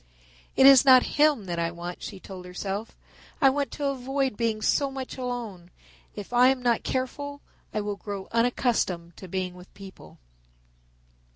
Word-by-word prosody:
"It 265 - +5
is 270 -2 +9
not 260 -2 +7 0.2
him 295 -9 +4
that 170 -2 -3
I 165 0 0
want," 175 +1 -7
she 195 - -7
told 185 -1 -10
herself; 195 +4 -5 0.4
"I 270 -3 +5
want 285 0 -1
to 290 - -4
avoid 270 -2 -1
being 220 -1 -1
so 280 -1 +2
much 265 -1 -6
alone. 235 -9 -5 0.5
If 205 +3 -8
I 245 +1 +6
am 260 -1 +1
not 240 -2 +2
careful 285 +2 -4 0.3
I 215 - -2
will 205 -1 -4
grow 200 -2 -6
unaccustomed 230 -8 0
to 190 - -10
being 185 0 -3
with 180 0 -14
people." 195 -1 -13
230 Hz, 165 wpm, -26 LUFS, 190-265 Hz, 0.5 s, is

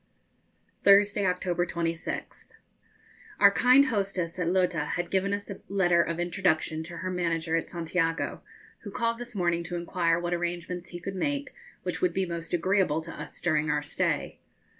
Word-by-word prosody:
_ - - -39
Thursday, 200 0 +5
October 180 -1 0
26th. 170 -1 -3 0.9
Our 200 - +8
kind 255 +6 +6
hostess 195 -7 -1
at 180 - 0
Lota 180 -4 +2
had 175 +3 -3
given 195 +1 +1
us 200 0 -3
a 195 - -8
letter 175 -3 +3
of 170 0 -2
introduction 175 -3 0
to 170 +1 -8
her 185 0 -3
manager 165 -2 0
at 165 - -1
Santiago, 165 -1 -1 0.4
who 205 - -8
called 230 +3 -1
this 245 -1 -7
morning 175 -2 +1
to 175 - -4
inquire 170 -1 +1
what 175 0 -2
arrangements 175 +1 -3
he 175 - -7
could 190 +3 -5
make 285 +7 -2 0.3
which - - -3
would 365 - +1
be 190 - +1
most 170 -1 -5
agreeable 175 -2 +2
to 165 +1 -7
us - - -7
during 155 -3 +1
our 150 0 +1
stay. 150 - -1
175 Hz, 170 wpm, -28 LUFS, 170-195 Hz, 0.9 s, Our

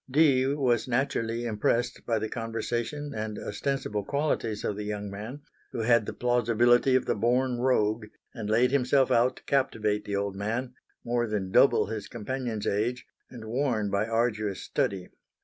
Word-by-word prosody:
Dee 135 -2 +4
was 135 -5 +1
naturally 120 -2 -1
impressed 120 +2 -1
by 115 -2 +2
the 110 0 -2
conversation 120 +6 -3
and 110 -1 -4
ostensible 135 -7 -2
qualities 140 -6 -1
of 105 - -1
the 105 - -5
young 105 -1 -4
man, 110 +8 -7 0.3
who 120 - -2
had 115 -1 +3
the - - -2
plausibility 120 +1 +3
of 130 - +2
the - - +1
born 120 +3 +1
rogue 110 -3 +1 0.3
and 110 -3 -5
laid 120 +4 +3
himself 135 0 +3
out 125 +2 +3
to - - -16
captivate 110 -6 0
the 100 - -2
old 100 -1 -2
man, 115 +6 -3 0.3
more 120 0 0
than 100 -3 -2
double - - +5
his 110 -1 -5
companion's 120 -1 -4
age 115 +5 -1 0.2
and 120 -3 -10
worn 115 -3 0
by 100 +2 +1
arduous 110 -4 -1
study. 95 -2 -1
115 Hz, 165 wpm, -28 LUFS, 105-125 Hz, 0.3 s, double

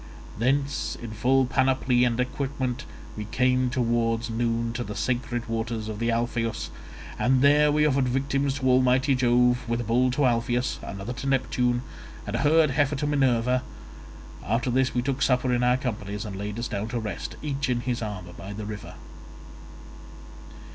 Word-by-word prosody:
Thence 135 +4 0
in 115 -2 -7
full 130 +5 +2
panoply 130 -1 +2
and 120 0 0
equipment 130 0 -2 0.3
we 105 - -5
came 125 +3 +1
towards 115 -2 0
noon 115 0 -1
to 120 - -3
the 105 -2 -6
sacred 120 -1 -2
waters 115 -1 -3
of 110 -1 -5
the 115 0 0
Alpheus, 115 0 -1 0.5
and 130 +1 +3
there 150 +1 +5
we 150 +1 +3
offered 135 -3 +2
victims 135 +1 0
to 140 -2 -4
almighty 130 +2 +4
Jove, 125 -1 +3
with 115 0 0
a - - -3
bull 120 +3 +2
to 135 +3 +1
Alpheus, 120 +1 0
another 100 +5 -6
to 135 - -5
Neptune, 125 -2 +1 0.4
and 105 - -3
a - - 0
herd 155 +1 +4
heifer 145 +1 +1
to 145 - -2
Minerva. 130 -4 +2 0.8
After 115 +5 0
this 130 +1 +1
we 120 - +1
took 135 +1 -2
supper 125 -1 +2
in 120 - +1
our 125 +1 +3
companies, 105 -6 -4
and 100 -2 -6
laid 105 +2 -5
us 120 +1 -2
down 100 +2 -3
to 120 +1 -3
rest 105 -3 -5
each 140 -2 -2
in 120 -1 0
his 120 -1 -2
armour 95 -5 -6
by 95 +4 -8
the 105 +1 -6
river. 105 -1 -7
125 Hz, 175 wpm, -26 LUFS, 115-130 Hz, 0.8 s, there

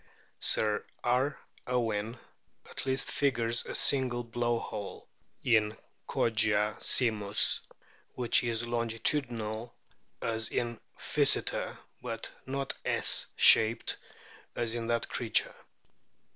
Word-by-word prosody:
Sir 105 -1 +2 0.2
R. 130 +4 +1 0.3
Owen 115 -2 -1 0.5
at - - -5
least 130 0 +1
figures 120 -4 +1
a - - -5
single 125 -3 +3
blow 120 0 -1
hole* 105 -3 -7 0.4
in 110 -3 +2 0.3
Kogia 110 -2 +1
simus, 105 -5 +2 0.6
which 125 -1 +3
is 120 -1 -1
longitudinal 115 -1 -2 0.4
as 110 -1 -1
in 120 -1 -2 0.2
Physeter, - - 0 0.2
but 115 -2 -5 0.2
not 135 0 -3
S - - +3
shaped 110 +1 +4 0.6
as 115 -1 -1
in 115 -1 -3
that 115 0 0
creature. 115 -2 0
115 Hz, 100 wpm, -30 LUFS, 110-120 Hz, 0.6 s, shaped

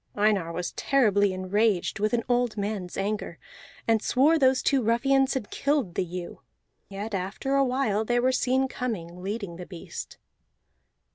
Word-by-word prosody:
Einar 205 -5 +2
was 175 +1 -3
terribly 205 -7 +2
enraged 195 +2 0
with 215 +1 +1
an 235 -1 +1
old 245 -2 +1
mans 200 -3 -3
anger, 205 +2 -2 0.5
and 225 -2 +3
swore 295 +8 +3
those 260 -1 +3
two 275 -2 +3
ruffians 270 +4 +2
had 240 -6 -4
killed 280 - 0
the - - 0
ewe; 180 0 -7 0.5
yet 205 +2 -6
after 195 +8 -2
a 275 0 +4
while 250 -5 +1
they 240 +2 +1
were 255 +2 +3
seen 260 +1 +1
coming, 180 -10 -5
leading 200 -3 -4
the 180 - -7
beast. 175 -3 -8
215 Hz, 155 wpm, -27 LUFS, 195-255 Hz, 0.5 s, a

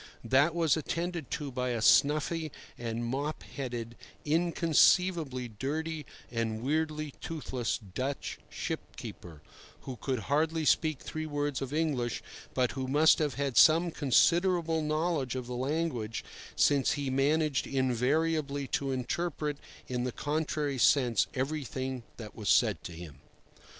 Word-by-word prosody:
That 140 +8 +3
was 165 -4 +3
attended 170 -1 -3
to 145 -2 -3
by 125 0 -2
a 120 -2 -1
snuffy 155 +4 +3 0.2
and 115 0 -3
mop 140 +6 -3
headed, 120 -4 -5 0.3
inconceivably 165 -3 +3
dirty, 150 +7 -4 0.2
and 115 -1 -2
weirdly 155 0 -1
toothless 130 -7 -3
Dutch 130 +7 -4
ship - - -5
keeper, 80 -4 -9 0.4
who 130 -2 -7
could 130 0 -2
hardly 155 +4 +1
speak 155 -2 +2
three 155 0 -5
words 145 -2 -2
of 135 -1 -4
English, 145 -7 -1 0.3
but 125 -1 +2
who 130 -1 -4
must 150 +4 +5
have 150 -6 0
had 140 -2 -2
some 165 +2 +6
considerable 165 +4 +3
knowledge 155 -3 0
of 130 -1 -3
the 125 - -6
language, 130 -4 -2 0.3
since 140 -3 +3
he 140 -2 -2
managed 145 +1 +1
invariably 140 +3 0
to 140 - -1
interpret 145 +3 -2 0.3
in 125 -1 -2
the 125 - -1
contrary 150 -1 -2
sense 120 -4 +4
everything 130 -2 -3 0.2
that 110 -3 -9
was 105 -2 -3
said 105 -8 +3
to 85 - -6
him. 80 -3 -10
140 Hz, 135 wpm, -30 LUFS, 125-155 Hz, 0.4 s, some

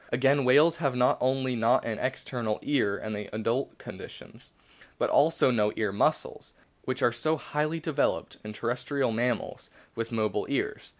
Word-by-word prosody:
Again, 135 +3 +3
whales 150 +6 +5
have 140 -6 -1
not 125 0 +3
only 130 0 +1
not 115 +3 +2
an 110 -2 -3
external 120 -4 -2
ear 110 -9 +1
(in 110 - -5
the 105 -1 -5
adult 115 +5 -1
con - - -10
dition), - - -12 0.5
but - - 0
also 150 -3 +4
no 105 -3 +2
ear 105 -2 -1
muscles, 100 - -1 0.3
which 130 +1 -2
are 120 - +3
so 155 +7 0
highly 155 +3 -2
developed 155 -3 -1
in 105 - -6
terrestrial 120 +4 -1
mammals 120 0 -2 0.2
with 115 0 -4
mobile 110 -2 -1
ears. - - -2
125 Hz, 165 wpm, -28 LUFS, 115-140 Hz, 0.5 s, whales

